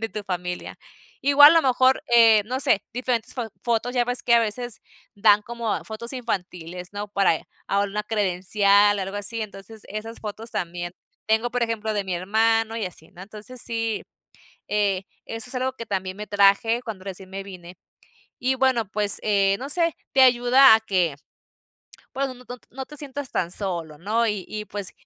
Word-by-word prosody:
de 225 - -2
tu 205 +1 -7
familia. 180 -1 -5 0.5
Igual, 290 +3 +8
a 330 - +6
lo - - -8
mejor, 255 +1 +3
eh, 225 -2 +7
no 255 +4 -3
sé, 255 -6 +3
diferentes 245 -1 -2
fo 240 -3 -4
fotos, 240 +1 -1
ya 245 - +2
ves 245 0 -2
que 235 - +4
a 235 - +6
veces 230 +1 -3 0.4
dan 210 0 +5
como 235 -1 -3
fotos 235 +3 -4
infantiles, 180 -7 -5
¿no?, 205 +1 -5
para 195 -4 +2
ella, - - -13 0.2
alguna 200 0 0
una 210 - -2
credencial, 205 0 +2
algo 195 +1 -4
así, 215 +3 -2
entonces 210 +1 -10
esas 220 +3 -7
fotos 220 +2 -7
también. 175 -2 -4 0.4
Tengo, 220 +2 +2
por 245 0 -1
ejemplo, 220 -2 -2
de 205 - 0
mi 185 -1 -3
hermano 225 +4 +1
y 225 - -2
así, 165 -3 -10
¿no? 180 -1 -12
Entonces 215 +5 -8
sí, 225 -2 -2 0.7
eh, 200 -2 +1 0.2
eso 225 +1 -3
es - - -2
algo 255 +1 -2
que 230 - -7
también 190 -1 -3
me 210 +1 -7
traje 205 +3 +3
cuando 215 -6 -8
recién 190 -1 -6
me 195 +1 -6
vine. 180 -2 -11 0.6
Y 255 +1 +1
bueno, 255 -5 +1
pues, 205 -1 +5
eh, 200 -2 +2
no 275 - -5
sé, 335 +1 +3 0.2
te 265 - +6
ayuda 250 0 +7
a 220 - +3
que, 185 -8 0 1.0
pues, 275 +1 -1
no 260 - -8
no 250 0 -16
no 245 - -6
no 265 +1 -7
te 300 - -12
sientas 285 -2 -5
tan 170 -1 -2
solo, 170 -6 -4
¿no? 220 +7 0
Y 210 -4 -2
y, 215 0 -5
pues, 205 -3 -2
215 Hz, 190 wpm, -23 LUFS, 195-240 Hz, 1.0 s, Igual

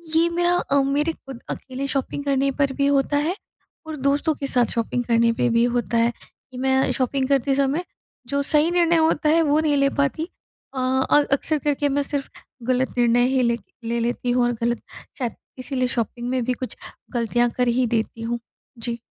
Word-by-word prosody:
ये 330 +1 +4
मेरा 350 +1 +2
अ, 280 -4 +2
मेरे 290 +4 0
खुद 270 -5 -11
अकेले 265 +1 -5
शॉपिंग 275 +1 -2
करने 275 0 +2
पर 275 -1 +2
भी 280 - +3
होता 285 +1 +2
है 310 +5 0 0.5
और 315 - -4
दोस्तों 290 +3 +1
के 280 - -4
साथ 245 -2 +3
शॉपिंग 235 +2 0
करने 230 0 +3
पे 235 - +1
भी 230 0 +3
होता 235 -1 -1
है, 230 +1 +3 0.4
कि 255 - -9
मैं 265 +1 +2
शॉपिंग 260 +1 0
करते 275 0 +2
समय, 280 +5 +1 0.4
जो 280 +3 0
सही 300 +3 +4
निर्णय 340 -1 +3
होता 315 -1 +2
है 330 +2 +4
वो 295 0 +3
नहीं 300 -2 +2
ले 275 0 +3
पाती। 280 +4 0 0.5
अ, - - -9
और 265 +3 +2
अक्सर 310 +3 +1
करके 290 0 0
मैं 285 +1 +1
सिर्फ 280 -1 -4 0.4
गलत 255 +1 +1
निर्णय 240 0 +4
ही 260 0 +2
ले 235 -1 +2 0.3
ले, 235 +1 -1
लेती 240 +1 -1
हूँ 245 0 +2
और 240 - +1
गलत 235 0 0 0.4
शायद, 245 -4 -2 0.2
इसीलिए 255 0 -1
शॉपिंग 240 0 -3
में 255 -1 0
भी 255 - +1
कुछ 255 +1 -6 0.4
गलतियाँ 240 0 +1
कर 250 -1 +2
ही 245 +2 +2
देती 225 0 -2
हूँ, 235 +1 -2 0.4
जी। 235 0 -4
265 Hz, 200 wpm, -23 LUFS, 240-285 Hz, 0.5 s, ये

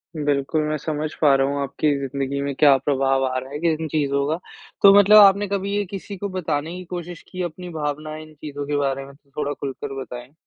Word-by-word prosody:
बिल्कुल, 145 0 0
मैं 155 0 -1
समझ 150 +1 -3
पा 145 -3 +6
रहा 135 0 +2
हूँ 140 0 -2
आपकी 140 +2 0
जिंदगी 140 0 -3
में 140 0 -2
क्या 140 0 +6
प्रभाव 135 -1 +1
आ 130 0 -1
रहा 130 +1 -5
है 160 +2 +1
इन 160 0 -3
चीज़ों 140 -2 0
का। 160 +3 -1 0.4
तो 200 -1 +9
मतलब 205 +1 +7
आपने 200 0 +7
कभी 200 0 -2
ये 205 0 0
किसी 195 +1 -7
को 200 +2 -4
बताने 165 -3 -3
की 185 - -7
कोशिश 175 -2 -6
की, 185 - -5
अपनी 175 +1 -6
भावना 155 -1 -4
इन 155 0 -11
चीज़ों 145 -1 -6
के 145 - -1
बारे 135 -1 -1
में? 140 - -13
थोड़ा 140 +1 -5
खुलकर 135 -1 -6
बताएँ। 125 +1 -9
150 Hz, 220 wpm, -22 LUFS, 140-175 Hz, 0.4 s, तो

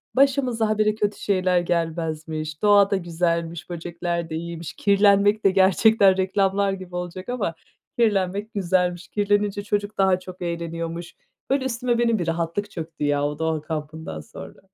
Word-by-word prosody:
Başımıza 255 -5 +2
ha 215 - 0
bire 215 0 +2
kötü 205 -1 -1
şeyler 185 -2 +2
gelmezmiş. 160 -2 -3
Doğa 205 -1 +5
da 200 - +3
güzelmiş, 170 -1 -2
böcekler 170 0 -4
de 160 - -4
iyiymiş. 170 0 -6
Kirlenmek 200 +1 +3
de 195 - +6
gerçekten, 195 +1 +5
reklamlar 195 +1 +1
gibi 185 -2 -8
olacak 180 +3 -5
ama, 230 -9 -1 0.5
kirlenmek 205 -1 +1
güzelmiş. 180 -2 0
Kirlenince 205 0 0
çocuk 205 0 -2
daha 190 -1 +3
çok 185 0 -11
eğleniyormuş. 170 0 -4 0.3
Böyle 270 0 +1
üstüme 245 -1 0
benim 230 -2 +2
bir 175 - -2
rahatlık 170 +5 -2
çöktü 165 -3 -6
ya 145 0 +1
o 145 0 -3
doğa 160 -1 0
kampından 155 - -6
sonra. 75 - -11
185 Hz, 150 wpm, -23 LUFS, 170-205 Hz, 0.5 s, de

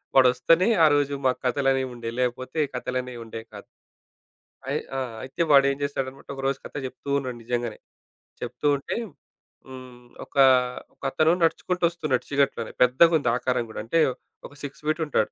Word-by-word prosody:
వాడు 130 -1 +7
వస్తేనే 165 - +3 0.2
ఆరోజు 145 -2 +3
మాకు 130 - +2
కథలు 135 +2 +2
అనేవి 130 -1 0
ఉండేవి. 115 0 -6
లేపోతే 130 +4 -2
కథలనేవి 125 0 -4
ఉండేవి 115 0 -8
కాదు. 100 - -10 1.0
అయ్యి - - -1 0.2
ఆ! - - 0 0.2
అయితే 130 +6 -5
వాడు 140 -1 +7
ఏం - - -2
జేస్తాడన్నమాట 135 -1 -4
ఒకరోజు 135 0 -1
కథ - - -10
జెప్తూ 130 +2 -8
ఉన్నాడు 125 -3 -5
నిజంగానే. 120 -2 -2 0.6
చెప్తూ 150 - -3
ఉంటే 140 - -5 0.7
హ్మ్. 125 -2 -12 0.2
ఒక - - -30 0.6
ఒక - - -52
అతను 160 +1 +3
నడుచుకుంటూ 180 +2 0
ఒస్తున్నాడు 150 -7 -1
చీకట్లోనే 140 -1 0
పెద్దగుంది 145 +2 +5
ఆకారం 125 -1 0
గూడా, 110 - -7
అంటే 165 +9 +1 0.5
ఒక - - -18
6 145 +1 -7
ఫీట్ 155 +2 0
ఉంటాడు. 120 -7 0
130 Hz, 155 wpm, -25 LUFS, 125-145 Hz, 1.0 s, వాడు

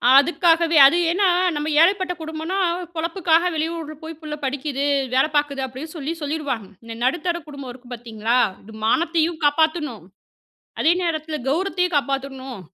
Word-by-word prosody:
அதுக்காகவே 330 +3 +4
அது 330 +6 +5
ஏனா, 390 +2 +2 0.3
நம்ப 295 +1 -2
ஏழைப்பட்ட 370 +1 +3
குடும்பம்னா 320 +4 -4 0.4
பொழப்புக்காக 335 +1 +1
வெளியூருல 320 0 -3
போய் 320 -1 -7
புள்ள 305 -1 -5
படிக்குது, 280 +1 -2 0.3
வேல 260 +1 +4
பார்க்குது 285 -2 +1
அப்டின்னு 265 +6 -8
சொல்லி 305 +1 -3
சொல்லிருவாங்க. 285 -8 -3 0.2
இந்த 230 0 -8
நடுத்தர 340 +6 0
குடும்பம் 280 -4 -8
இருக்கு 245 0 -14
பார்த்தீங்களா, 230 0 -2 0.3
இது 220 +2 -13
மானத்தையும் 330 +4 +1
காப்பாத்துணும், 300 - +1 0.8
அதே 325 - +4
நேரத்துல 315 -2 -2
கௌரவத்தையும் 360 +2 0
காப்பாத்துணும். 270 -4 -3
310 Hz, 130 wpm, -22 LUFS, 270-335 Hz, 0.8 s, அது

